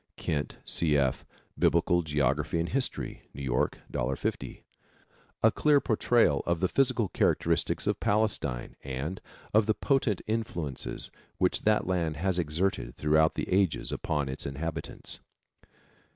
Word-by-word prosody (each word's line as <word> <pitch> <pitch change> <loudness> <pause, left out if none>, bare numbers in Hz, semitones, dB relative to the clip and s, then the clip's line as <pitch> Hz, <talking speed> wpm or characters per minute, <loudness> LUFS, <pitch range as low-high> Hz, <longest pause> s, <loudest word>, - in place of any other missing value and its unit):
Kent, 75 -2 -2
C. 75 -3 +3
F., 65 -3 0 0.3
Biblical 85 +1 +3
Geography 75 +1 0
and 85 - -1
History. 135 -1 -3
New 70 - -6
York, 65 -2 0
$1.50. 65 +2 -3 0.8
A 110 - +7
clear 150 +3 +4
portrayal 115 - +3
of 85 -1 +1
the 95 - +2
physical 125 0 +2
characteristics - - +1
of - - 0
Palestine 100 - 0
and 70 +7 -4 0.3
of 110 0 +4
the 110 - +2
potent 130 -9 +1
influences 90 - -3 0.3
which 90 - +1
that 110 0 +3
land 85 -4 -1
has 90 +2 0
exerted 80 -5 -1
throughout 75 +2 +3
the - - -2
ages 95 -4 +1
upon 75 -3 -1
its 65 +1 -4
inhabitants. 75 +4 -5
85 Hz, 130 wpm, -29 LUFS, 75-105 Hz, 0.8 s, A